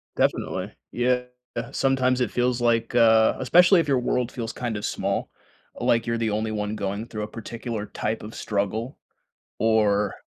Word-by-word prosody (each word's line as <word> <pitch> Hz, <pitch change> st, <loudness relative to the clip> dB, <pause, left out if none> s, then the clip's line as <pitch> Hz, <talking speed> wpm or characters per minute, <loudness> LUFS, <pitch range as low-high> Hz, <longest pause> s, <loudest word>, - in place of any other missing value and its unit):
Definitely. -, -, 0 dB, 0.2 s
Yeah, 125 Hz, +1 st, +1 dB, 0.5 s
sometimes 130 Hz, -2 st, +1 dB
it 125 Hz, -, 0 dB
feels 125 Hz, 0 st, 0 dB
like, 115 Hz, -1 st, +1 dB
uh 110 Hz, -2 st, +5 dB
especially 180 Hz, +8 st, +6 dB
if 165 Hz, -, 0 dB
your 135 Hz, -3 st, +3 dB
world 125 Hz, 0 st, -1 dB
feels 115 Hz, -2 st, -5 dB
kind 120 Hz, -3 st, -3 dB
of 105 Hz, -, -4 dB
small, -, -, -2 dB, 0.5 s
like 115 Hz, -1 st, +2 dB
you're 115 Hz, 0 st, -1 dB
the 115 Hz, -1 st, 0 dB
only 110 Hz, +1 st, -1 dB
one 105 Hz, 0 st, -2 dB
going 100 Hz, +1 st, -3 dB
through 110 Hz, -3 st, -5 dB
a -, -, -4 dB
particular 115 Hz, -1 st, -6 dB
type 110 Hz, +1 st, -3 dB
of 110 Hz, +2 st, -9 dB
struggle, 110 Hz, +5 st, -2 dB, 0.6 s
or, 105 Hz, -2 st, +2 dB
115 Hz, 165 wpm, -25 LUFS, 110-125 Hz, 0.6 s, especially